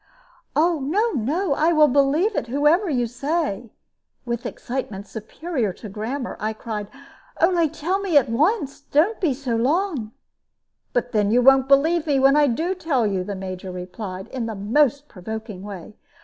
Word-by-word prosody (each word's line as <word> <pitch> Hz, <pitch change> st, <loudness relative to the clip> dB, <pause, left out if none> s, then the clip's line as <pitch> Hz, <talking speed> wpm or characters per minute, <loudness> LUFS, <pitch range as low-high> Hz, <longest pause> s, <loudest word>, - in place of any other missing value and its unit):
"No, 340 Hz, -, +2 dB
no; 290 Hz, -, 0 dB
I 315 Hz, +4 st, +2 dB
will 305 Hz, -1 st, +6 dB
believe 290 Hz, -, +2 dB
it, 235 Hz, -, -1 dB
whoever 295 Hz, -, +2 dB
you 250 Hz, -5 st, +1 dB
say," 245 Hz, -, -2 dB, 0.6 s
with 235 Hz, -1 st, -3 dB
excitement 225 Hz, -6 st, -5 dB
superior 220 Hz, -, -3 dB
to 215 Hz, -, -10 dB
grammar, 240 Hz, +6 st, -4 dB
I 215 Hz, +1 st, -2 dB
cried; 215 Hz, -2 st, -5 dB, 0.5 s
"only 335 Hz, -2 st, +3 dB
tell 360 Hz, +7 st, -2 dB
me 380 Hz, -6 st, +2 dB
at 280 Hz, -, +4 dB
once 285 Hz, -, 0 dB
don't 325 Hz, +11 st, +1 dB
be 305 Hz, -8 st, +1 dB
so 255 Hz, -3 st, -2 dB
long." 275 Hz, -, 0 dB, 0.8 s
"But 245 Hz, 0 st, -1 dB
then 210 Hz, -2 st, +2 dB
you 245 Hz, +3 st, +3 dB
won't 270 Hz, 0 st, +6 dB
believe 310 Hz, +4 st, +3 dB
me 280 Hz, -2 st, +2 dB
when 270 Hz, +1 st, +5 dB
I 295 Hz, -1 st, +5 dB
do 320 Hz, +9 st, 0 dB
tell 315 Hz, -10 st, 0 dB
you," 195 Hz, -3 st, 0 dB
the 200 Hz, +1 st, -5 dB
Major 185 Hz, 0 st, -6 dB
replied, 185 Hz, +1 st, -7 dB
in 245 Hz, -3 st, -4 dB
the 220 Hz, -, -4 dB
most 280 Hz, +8 st, +1 dB
provoking 220 Hz, -1 st, -7 dB
way. 200 Hz, -1 st, -9 dB
265 Hz, 165 wpm, -23 LUFS, 220-310 Hz, 0.8 s, will